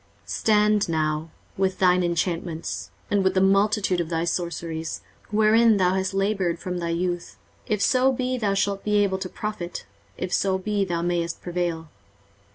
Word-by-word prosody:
23:047:012 - - -20
Stand 210 -2 +3
now 155 0 -1 0.3
with 190 -1 0
thine 180 -1 +4
enchantments, 170 -1 -2 0.2
and 200 -1 +3
with 190 - +1
the - - +4
multitude 195 -1 +3
of 165 - -4
thy 165 -1 0
sorceries, 165 -2 -3 0.3
wherein 220 +1 +4
thou 185 -1 +3
hast 190 0 -1
laboured 195 -3 0
from 180 0 -4
thy 170 -1 -2
youth; 175 +1 -2 0.3
if 210 -2 0
so 255 +1 +4
be 255 0 -1
thou 205 -5 0
shalt 195 0 0
be 210 0 0
able 190 -1 0
to 185 -1 -4
profit, 210 -5 -5 0.3
if 185 -1 -4
so 190 -1 +2
be 205 +1 -1
thou 170 -3 -2
mayest 170 -1 -1
prevail. 175 -2 -2
185 Hz, 165 wpm, -24 LUFS, 170-205 Hz, 0.3 s, thine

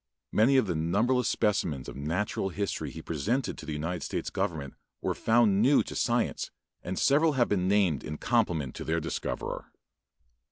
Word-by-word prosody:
Many 125 +6 +4
of 130 - +4
the 90 - -1
numberless 105 +11 +1
specimens 95 - 0
of - - -7
natural 85 +7 -1
history 100 +2 -3
he 80 - -9
presented 110 - -1
to 80 - -9
the - - -3
United 80 +3 -3
States - - -3
government 70 -5 -2 0.3
were - - -1
found 110 -3 +3
new 135 +5 +5
to - - -8
science 120 -1 0 0.3
and 90 +1 -4
several 150 +3 +4
have 125 -3 +2
been 95 -3 +1
named 95 -8 +2
in 75 0 -5
compliment 85 - 0
to - - -5
their 80 +1 0
discoverer. 80 +1 -4
95 Hz, 170 wpm, -29 LUFS, 80-120 Hz, 0.3 s, new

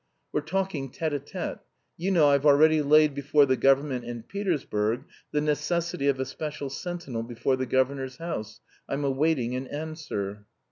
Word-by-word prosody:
We're 150 - 0
talking 160 -4 -2
tête 160 +5 -2
à 145 - 0
tête. 180 +4 -5 0.4
You 180 +3 -2
know 165 -6 +5
I've 140 -1 +3
already 155 +2 +6
laid 150 0 +5
before 140 +1 +3
the 130 -1 +2
government 135 -1 +2
in 120 -1 -6
Petersburg 125 - -1 0.3
the 150 - +1
necessity 150 0 0
of 135 -2 +2
a 130 - 0
special 150 -2 -5
sentinel 170 -7 -4
before 120 +3 -1
the 130 0 -3
governor's 130 0 0
house. 110 -11 -5 0.3
I'm 140 +1 -1
awaiting 135 -3 +1
an 130 +1 -4
answer." 145 -11 -5
140 Hz, 160 wpm, -27 LUFS, 130-155 Hz, 0.4 s, already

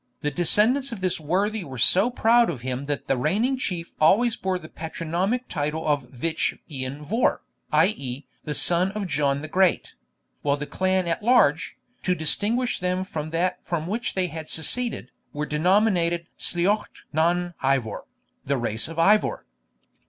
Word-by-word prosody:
The 150 - -1
descendants 215 - +2
of 220 -5 -6
this 185 -2 0
worthy 195 +7 0
were 135 -5 -8
so 185 - +4
proud 235 -1 +4
of 125 - -4
him 130 +2 -4
that 145 -1 -2
the 135 - +1
reigning 210 - +1
chief 180 -9 -4
always 225 +9 +4
bore 190 -1 -1
the 165 -3 -10
patronymic 170 +10 -3
title 150 0 -3
of 145 -5 0
Vich 160 +6 -2
Ian 135 +1 -5
Vohr, 225 - +1 0.3
i.e. 145 -5 0 0.2
the 150 -2 -3
son 175 +6 +4
of 210 -1 -3
John 140 -3 0
the - - -5
Great; 185 +3 +1 0.5
while 145 0 +1
the 150 - -4
clan 185 +2 0
at 170 +5 -1
large, 210 - +3 0.3
to 180 - +1
distinguish 220 +10 0
them 180 +1 -1
from 155 -5 -5
that 180 +3 -1
from 165 -3 -3
which 225 +7 -3
they 185 -1 +1
had 160 -3 -7
seceded, 235 +9 0 0.2
were 150 +1 -2
denominated 175 +1 +2
Sliochd 195 +5 -1
nan 175 +3 +1
Ivor, 130 -6 0 0.4
the 140 +1 0
race 115 -1 -1
of 165 0 -9
Ivor. 205 +6 +3
170 Hz, 160 wpm, -24 LUFS, 150-200 Hz, 0.5 s, so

